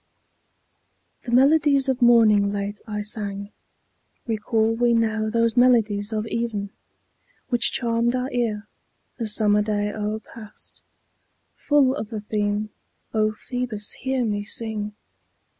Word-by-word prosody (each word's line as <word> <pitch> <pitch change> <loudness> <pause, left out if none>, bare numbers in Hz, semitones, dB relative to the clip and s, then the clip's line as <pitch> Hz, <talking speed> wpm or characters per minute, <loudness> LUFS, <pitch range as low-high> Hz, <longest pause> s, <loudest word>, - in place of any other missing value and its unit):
The 240 - -5
Melodies 275 +1 +4
of 265 -1 -1
Morning 220 -4 +5
late 205 +1 -4
I 210 -1 -3
sang. 205 -1 -3 0.7
Recall 220 0 0
we 235 +1 +2
now 220 -1 0
those 230 +1 +1
Melodies 225 -4 +3
of 215 0 -2
Even 225 -3 -3 0.8
Which 240 -2 +3
charmed 235 0 +1
our 255 +1 -2
ear, 220 -4 -2 0.5
the 230 - -2
summer 210 -1 +3
day 210 0 -1
o'erpast; 215 +1 -7 0.7
Full 285 -3 +2
of 220 -7 -5
the 220 -2 -5
theme, 210 0 -2 0.4
O 215 -1 +2
Phoebus, 240 -2 -4
hear 260 -1 -2
me 205 -2 -2
sing. 210 -1 -3
220 Hz, 120 wpm, -23 LUFS, 210-240 Hz, 0.8 s, Morning